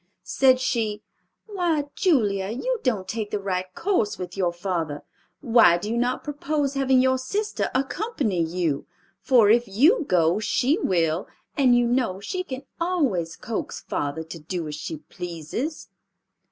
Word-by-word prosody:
Said 260 -1 +3
she, 225 -5 -1 0.4
"Why, 345 -8 -1
Julia, 205 - +1
you 480 - -2
don't 210 -8 -1
take 215 +1 -3
the 210 - -2
right 185 -2 -3
course 345 - 0
with 180 -1 -6
your 185 -3 +1
father. 170 -4 -3 0.4
Why 230 - +5
do 205 +5 -4
you - - 0
not 245 +1 0
propose 295 -1 -1
having 265 -2 +3
your 260 0 +2
sister 410 +11 -2
accompany 275 - -1
you? 165 -3 -1 0.3
For, 220 0 +5
if 235 +1 +3
you 295 - +4
go, 170 +1 +3
she 260 - +1
will, 170 - +1 0.3
and 255 -4 +4
you 240 - +3
know 240 -6 0
she 365 - -3
can 265 -6 -7 0.2
always 270 - 0
coax 230 -3 -4
father 145 +3 -3
to 160 +1 -9
do 165 +1 -4
as 150 - -5
she 160 +2 -5
pleases." 175 - -6
225 Hz, 155 wpm, -24 LUFS, 180-275 Hz, 0.4 s, Why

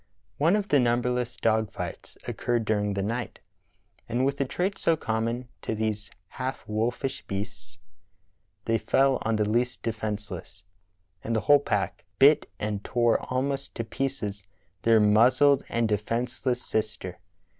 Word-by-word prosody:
One 165 +7 +4
of 205 -1 -1
the 145 - +5
numberless 125 0 +1
dog 110 -2 +1
fights - - -6
occurred 120 -2 -1
during 105 -2 0
the 100 - -1
night, 115 +3 -3 0.7
and 125 +3 +1
with 140 +1 0
the 140 - +1
trait 185 +9 -2
so 165 - +2
common 115 -1 -2
to 110 - -2
these 105 -1 -2 0.3
half 130 -3 -4
wolfish 120 +5 -1
beasts 100 -2 -6 0.9
they 115 0 +2
fell 135 +5 +3
on 115 0 0
the 105 -1 +1
least 120 +3 0
defenceless, 105 -5 -4 0.6
and 115 - -1
the 110 - +1
whole 145 0 +6
pack 145 - -2
bit - - +6
and 105 -1 -2
tore 120 -2 +2
almost 135 +2 -1
to 115 - -2
pieces 110 -5 -3 0.4
their 115 -1 +5
muzzled 125 +7 +5
and 115 -1 +1
de 105 -1 +2
fenceless 120 +3 -2
sister. 110 -4 -3
115 Hz, 145 wpm, -27 LUFS, 105-130 Hz, 0.9 s, whole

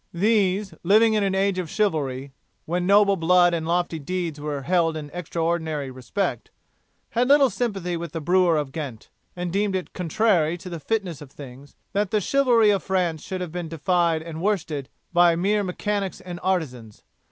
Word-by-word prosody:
These, 200 0 +1
living 215 +5 +4
in 210 -1 +2
an 195 -1 0
age 195 -1 +1
of 175 -4 -4
chivalry, 140 -10 -1 0.3
when 175 +2 -1
noble 200 0 +5
blood 175 +1 +4
and 160 -1 -2
lofty 175 -1 0
deeds 165 -1 -4
were 145 -2 -4
held 165 0 +1
in 145 -1 -7
extraordinary 160 -4 -2
respect, 130 +10 -3 0.6
had 245 +1 +1
little 280 -2 +5
sympathy 195 -7 -2
with 170 -1 -5
the 165 - -4
brewer 175 +1 +3
of 145 -3 -2
Ghent, 135 -7 -7 0.2
and 175 -1 -4
deemed 200 0 +1
it 185 - -4
contrary 180 -3 +1
to 180 +1 -9
the 170 - -5
fitness 185 -4 -2
of 145 - -10
things 135 0 -12 0.2
that 200 0 0
the 215 - +1
chivalry 235 -1 +3
of 200 -2 +1
France 180 -5 -1
should 185 -1 -5
have 180 -3 -4
been 175 -1 -5
defied 165 0 +1
and 165 -1 -7
worsted 160 -9 -1 0.2
by 175 -1 +5
mere 200 +5 +1
mechanics 200 +1 -2
and 175 -1 -8
artisans. 125 - -3
175 Hz, 175 wpm, -24 LUFS, 160-195 Hz, 0.6 s, noble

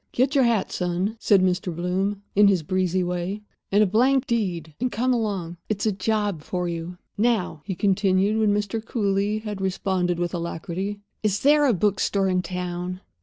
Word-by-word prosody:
"Get 260 +3 +2
your 270 -3 +4
hat, 230 -5 +1
son," 180 +4 -1
said 200 -4 +4
Mr. 180 0 0
Bloom, 190 +4 -1
in 205 0 +6
his 190 -5 +3
breezy 185 +2 0
way, 180 +4 -3 0.3
"and 205 +2 +5
a - - +4
blank 255 +7 +3
deed, 180 - -2
and 250 +1 -1
come 255 +3 +1
along. 195 -7 -2
It's 205 -1 -1
a 215 - +3
job 205 -3 -1
for 180 +3 -3
you." 170 +1 -5 0.2
"Now," 215 -9 +1
he 195 -2 -3
continued, 195 +2 +2
when 215 -2 +3
Mr. 210 +2 -1
Cooly 205 -2 0
had 210 -3 -5
responded 185 -2 0
with 175 0 -2
alacrity, 175 +4 -4 0.2
"is 210 -1 0
there 295 +1 +5
a 250 - +4
bookstore 195 +1 +1
in 185 0 +2
town?" 180 0 -4
195 Hz, 175 wpm, -24 LUFS, 180-215 Hz, 0.3 s, in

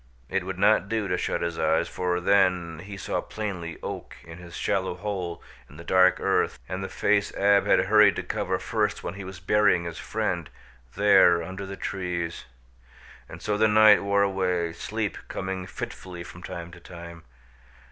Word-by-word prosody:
It 95 -1 0
would 95 0 -5
not 100 0 +3
do 110 -2 -1
to 90 - 0
shut 90 - -2
his 85 -1 -3
eyes, - - +2
for 90 -1 -1
then 90 -4 +2
he 100 +3 -8
saw - - -2
plainly 95 -6 -5
Oak - - -6
in 80 +1 -11
his 85 -1 -11
shallow - - -1
hole 90 -3 -4 0.3
in 75 - -14
the 85 - -9
dark 95 +1 +4
earth - - +1
and 95 +1 -4
the 95 - -4
face 100 0 +1
Ab 100 0 +3
had - - +5
hurried 105 +1 +6
to - - -3
cover - - -2
first - - -1
when 85 - -4
he 100 +1 -8
was 95 -1 -9
burying 105 -1 +3
his 85 -1 -6
friend, - - -2 0.5
there 95 -4 +5
under 95 +3 -6
the 100 0 -7
trees. 90 -3 -4 0.8
And - - -10
so 105 -1 -1
the 110 - +5
night 105 0 +7
wore 100 0 +2
away, 90 -4 0
sleep 110 +3 -3
coming 95 -1 -4
fitfully 90 -2 -7
from 85 - -12
time 85 -1 -7
to 90 - -12
time. 85 -1 -11
95 Hz, 180 wpm, -26 LUFS, 85-100 Hz, 0.8 s, night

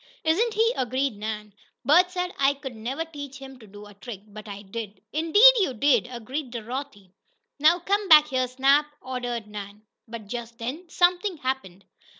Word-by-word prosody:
"Isn't 425 +8 +1
he!" 455 +2 +3
agreed 260 0 -1
Nan. 210 0 -6 0.3
"Bert 355 +5 +5
said 360 0 -3
I 275 0 +3 0.2
never 250 +8 -4
could 325 - -25
teach 285 -2 -8
him 270 -1 -11
to 220 - -15
do 205 +1 -12
a 205 - -14
trick, 200 0 -9
but 215 0 -12
I 200 0 -8
did." 210 0 -7
"Indeed 370 +11 +7
you 320 -11 0
did!" 245 -1 +3
agreed 255 +4 -5
Dorothy. 235 -4 -7 0.5
"Now 315 +4 +5
come 395 +3 -1
back 300 -1 +8
here, 255 -2 0
Snap!" 275 +4 +3
ordered 245 -3 -4
Nan. 210 0 -9 0.2
But 225 -1 -8
just 235 +1 -7
then 275 +10 -6
something 355 +2 +2
happened. 255 -9 -4
260 Hz, 170 wpm, -25 LUFS, 220-315 Hz, 0.5 s, back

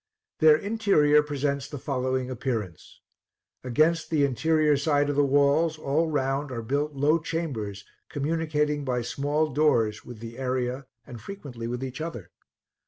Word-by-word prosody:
Their 155 -1 +7
interior 195 -8 +3
presents 140 -1 -2
the 145 - -6
following 130 -1 -2
appearance: 110 - -5 0.6
against 155 +6 +2
the 150 -3 +3
interior 155 +3 +2
side 145 0 +1
of - - -3
the 145 - +4
walls 145 +3 +3
all 155 +2 0
round 135 -1 -1
are 115 -2 -4
built 145 +5 -1
low 150 +4 +3
chambers, 130 -12 -4 0.2
communicating 150 0 -1
by 125 -3 -1
small 145 +4 -1
doors 115 -8 +2
with 120 - -10
the 115 +2 -9
area 130 0 -2 0.2
and 120 -3 -10
frequently 135 - -7
with 125 +2 -4
each 130 +2 -5
other. 160 - -6
140 Hz, 145 wpm, -26 LUFS, 125-155 Hz, 0.6 s, Their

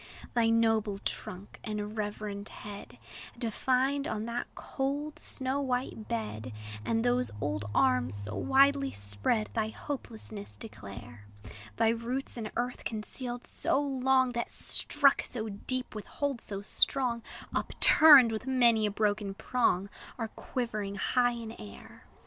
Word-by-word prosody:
Thy 230 -2 +3
noble 225 -3 +2
trunk 195 0 -5
and 210 -1 -4
reverend 210 -1 -4
head, 205 -1 -9 0.4
Defined 260 +4 0
on 215 0 -3
that 235 +1 -3
cold, 290 +3 -3
snow 265 +1 -2
white 250 -4 -2
bed, 110 +1 -4 0.3
And 225 - 0
those 245 +1 +2
old 100 0 -2
arms, 125 -6 +2
so 105 +1 -6
widely 275 +1 +4
spread, 100 - -1
Thy 220 -2 0
hopelessness 220 -4 -7
declare: 105 - -10 0.5
Thy 225 - +4
roots, 235 +4 -2
in 220 -3 -4
earth 245 +1 -2
concealed 240 +3 -3
so 270 - 0
long 265 -2 +2
That 235 0 -2
struck 285 -2 +3
so 220 -3 -4
deep, 250 +5 -1
with 215 -1 -7
hold 280 -5 -2
so 200 -1 -6
strong, 240 +2 +1 0.3
Upturned 290 -7 +7
with 220 +4 -4
many 235 -4 +4
a - - -2
broken 205 -1 0
prong, 200 -5 +1 0.3
Are 225 -2 -3
quivering 215 -5 -4
high 245 +5 +2
in 230 -2 -6
air. 100 -1 -12
225 Hz, 130 wpm, -30 LUFS, 205-255 Hz, 0.5 s, Upturned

